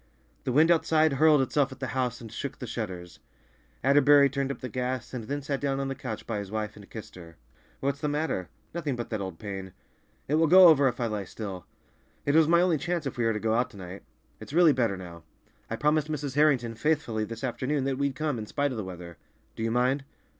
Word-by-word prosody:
The -, -, 0 dB
wind 155 Hz, +6 st, +5 dB
outside 160 Hz, -2 st, +3 dB
hurled 150 Hz, 0 st, +5 dB
itself 140 Hz, +1 st, +1 dB
at 130 Hz, -, -10 dB
the 130 Hz, -1 st, -3 dB
house 125 Hz, -2 st, -1 dB
and 115 Hz, -2 st, -9 dB
shook 140 Hz, +4 st, -5 dB
the -, -, -6 dB
shutters. 95 Hz, -7 st, -6 dB, 0.6 s
Atterbury 140 Hz, +1 st, +6 dB
turned 140 Hz, 0 st, -1 dB
up -, -, -5 dB
the 130 Hz, -, -5 dB
gas, 125 Hz, +1 st, -3 dB
and 120 Hz, -4 st, -5 dB
then 145 Hz, +4 st, -4 dB
sat 140 Hz, -1 st, -2 dB
down 135 Hz, -1 st, 0 dB
on 135 Hz, 0 st, -2 dB
the -, -, -2 dB
couch 125 Hz, -5 st, -6 dB
by 110 Hz, -3 st, -3 dB
his 100 Hz, -2 st, -6 dB
wife 105 Hz, 0 st, -3 dB
and 100 Hz, -2 st, -14 dB
kissed 110 Hz, -3 st, -9 dB
her. 85 Hz, -3 st, -13 dB, 0.4 s
"What's 140 Hz, +1 st, -1 dB
the 150 Hz, -, 0 dB
matter?" 145 Hz, -, -2 dB, 0.2 s
"Nothing 155 Hz, -6 st, -2 dB
but 120 Hz, 0 st, -6 dB
that 110 Hz, -2 st, -2 dB
old 95 Hz, -4 st, -5 dB
pain; 95 Hz, -2 st, -7 dB, 0.5 s
it 145 Hz, -, -2 dB
will 165 Hz, -, +4 dB
go 180 Hz, +2 st, +9 dB
over 140 Hz, -4 st, +5 dB
if 125 Hz, -1 st, -2 dB
I 120 Hz, -, 0 dB
lie 105 Hz, -3 st, -3 dB
still—it 100 Hz, +8 st, -7 dB
was 160 Hz, 0 st, +5 dB
my 170 Hz, +1 st, +5 dB
only 175 Hz, -4 st, +2 dB
chance 175 Hz, -1 st, -2 dB
if 135 Hz, -, -3 dB
we 120 Hz, -, 0 dB
are 115 Hz, -, +2 dB
to 105 Hz, -, -2 dB
go 110 Hz, +1 st, 0 dB
out 120 Hz, +1 st, +1 dB
to -, -, -14 dB
night. 95 Hz, +1 st, -8 dB, 0.4 s
It's -, -, -10 dB
really 170 Hz, -2 st, +6 dB
better 115 Hz, -7 st, 0 dB
now. 85 Hz, -2 st, -10 dB, 0.5 s
I -, -, -2 dB
promised 150 Hz, +1 st, +1 dB
Mrs. 145 Hz, -3 st, -3 dB
Harrington 135 Hz, -6 st, +3 dB
faithfully 120 Hz, -3 st, 0 dB
this 115 Hz, +2 st, -7 dB
afternoon 130 Hz, +2 st, -1 dB
that 135 Hz, 0 st, -1 dB
we'd 140 Hz, -1 st, 0 dB
come, 150 Hz, -5 st, -2 dB
in 105 Hz, -, -6 dB
spite 145 Hz, +4 st, -1 dB
of 125 Hz, -, -5 dB
the 110 Hz, -, -3 dB
weather. 90 Hz, -2 st, -9 dB, 0.4 s
Do -, -, -7 dB
you 115 Hz, -, 0 dB
mind?" 125 Hz, +4 st, +1 dB
130 Hz, 235 wpm, -28 LUFS, 110-145 Hz, 0.6 s, go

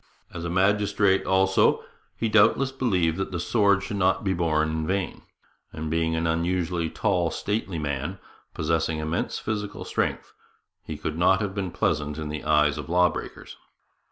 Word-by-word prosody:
As 85 Hz, -, -6 dB
a 85 Hz, -, -3 dB
magistrate, 100 Hz, +1 st, +2 dB
also, 95 Hz, 0 st, +3 dB, 0.3 s
he 115 Hz, -, 0 dB
doubtless 110 Hz, +5 st, +4 dB
believed 95 Hz, -12 st, 0 dB
that 95 Hz, -, -2 dB
the 90 Hz, -, -3 dB
sword 100 Hz, 0 st, +2 dB
should 100 Hz, 0 st, -4 dB
not 95 Hz, 0 st, +2 dB
be 95 Hz, -2 st, +1 dB
borne 80 Hz, -3 st, +1 dB
in 80 Hz, 0 st, -2 dB
vain; 95 Hz, 0 st, -2 dB, 0.5 s
and 80 Hz, 0 st, -5 dB
being 80 Hz, 0 st, +1 dB
an 80 Hz, +1 st, -1 dB
unusually 85 Hz, 0 st, 0 dB
tall, 90 Hz, -4 st, 0 dB
stately 100 Hz, -1 st, -3 dB
man, 75 Hz, +4 st, -3 dB, 0.4 s
possessing 80 Hz, 0 st, 0 dB
immense 80 Hz, +1 st, -2 dB
physical 105 Hz, -2 st, -4 dB
strength, -, -, -2 dB, 0.5 s
he 80 Hz, -, -7 dB
could 80 Hz, +1 st, -4 dB
not 95 Hz, +2 st, +4 dB
have 100 Hz, -3 st, -2 dB
been 95 Hz, -2 st, -3 dB
pleasant 75 Hz, -2 st, -1 dB
in 75 Hz, -1 st, -4 dB
the 75 Hz, 0 st, -5 dB
eyes 75 Hz, -2 st, +2 dB
of -, -, -7 dB
law 90 Hz, +1 st, +4 dB
breakers. -, -, -8 dB
90 Hz, 165 wpm, -25 LUFS, 80-100 Hz, 0.5 s, doubtless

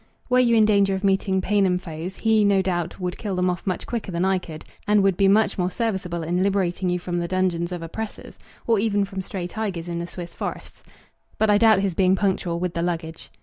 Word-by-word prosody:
Were 250 Hz, -, +5 dB
you 240 Hz, -2 st, +4 dB
in 220 Hz, -1 st, +6 dB
danger 200 Hz, -2 st, +3 dB
of 190 Hz, -, -5 dB
meeting 195 Hz, -1 st, +1 dB
Paynim 195 Hz, -2 st, +2 dB
foes, 175 Hz, +1 st, -6 dB
he, 220 Hz, -1 st, +2 dB
no 200 Hz, -2 st, +3 dB
doubt, 175 Hz, -2 st, -2 dB
would 180 Hz, -1 st, -4 dB
kill 200 Hz, -3 st, -3 dB
them 180 Hz, 0 st, +1 dB
off 180 Hz, +2 st, -6 dB
much 185 Hz, -, -2 dB
quicker 230 Hz, -5 st, -4 dB
than 170 Hz, +1 st, 0 dB
I 190 Hz, -1 st, +2 dB
could 160 Hz, -3 st, -10 dB
do, -, -, -24 dB, 0.2 s
and 210 Hz, -1 st, +4 dB
would 195 Hz, -2 st, +3 dB
be 195 Hz, +1 st, +3 dB
much 205 Hz, 0 st, +3 dB
more 180 Hz, 0 st, +1 dB
serviceable 190 Hz, -5 st, -2 dB
in 175 Hz, +3 st, 0 dB
liberating 190 Hz, -2 st, 0 dB
you 180 Hz, -, +1 dB
from 175 Hz, 0 st, -3 dB
the 170 Hz, -, -2 dB
dungeons 180 Hz, -1 st, 0 dB
of 175 Hz, -2 st, -5 dB
oppressors, 215 Hz, +6 st, -7 dB, 0.3 s
or 225 Hz, -3 st, +3 dB
even 205 Hz, -1 st, +1 dB
from 195 Hz, -1 st, -5 dB
stray 185 Hz, -1 st, -5 dB
tigers 180 Hz, -3 st, -4 dB
in 170 Hz, -1 st, -3 dB
the 170 Hz, -, -4 dB
Swiss 175 Hz, -1 st, -7 dB
forests. -, -, -6 dB, 0.6 s
But 220 Hz, -1 st, +3 dB
I 205 Hz, -, +4 dB
doubt 220 Hz, -3 st, +5 dB
his 195 Hz, -2 st, 0 dB
being 185 Hz, +2 st, +3 dB
punctual 185 Hz, -3 st, -1 dB
with 180 Hz, -1 st, -2 dB
the 170 Hz, -, -2 dB
luggage. 165 Hz, -2 st, -4 dB
190 Hz, 235 wpm, -23 LUFS, 175-200 Hz, 0.6 s, in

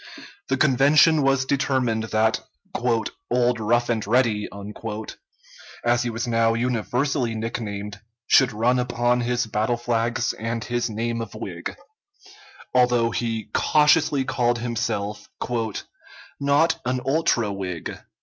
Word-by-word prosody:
The 130 Hz, -, 0 dB
convention 150 Hz, +3 st, +5 dB
was 135 Hz, -1 st, +2 dB
determined 130 Hz, -5 st, 0 dB
that 110 Hz, +2 st, +1 dB, 0.9 s
"Old 120 Hz, -1 st, +2 dB
Rough 120 Hz, +2 st, +1 dB
and 110 Hz, -4 st, -1 dB
Ready," 115 Hz, -3 st, +2 dB, 1.4 s
as 120 Hz, 0 st, +3 dB
he 120 Hz, -, -1 dB
was 115 Hz, +2 st, -3 dB
now 115 Hz, -1 st, +2 dB
universally 125 Hz, +1 st, -1 dB
nicknamed, 105 Hz, -2 st, -4 dB, 0.3 s
should 130 Hz, +1 st, +5 dB
run 120 Hz, +4 st, +1 dB
upon 120 Hz, 0 st, +1 dB
his 120 Hz, 0 st, 0 dB
battle 110 Hz, +2 st, 0 dB
flags 120 Hz, 0 st, 0 dB
and 115 Hz, +1 st, -4 dB
his 120 Hz, 0 st, -1 dB
name 115 Hz, +2 st, -2 dB
of 110 Hz, -2 st, -7 dB
Whig 90 Hz, -6 st, -6 dB, 1.0 s
although 125 Hz, -2 st, +3 dB
he 115 Hz, -2 st, -3 dB
cautiously 150 Hz, -2 st, +3 dB
called 120 Hz, -2 st, +1 dB
himself 105 Hz, -3 st, -3 dB, 1.1 s
"not 140 Hz, +4 st, +2 dB
an 125 Hz, +1 st, -1 dB
ultra 135 Hz, -7 st, +1 dB
Whig." 90 Hz, -4 st, -5 dB
120 Hz, 115 wpm, -23 LUFS, 110-125 Hz, 1.4 s, convention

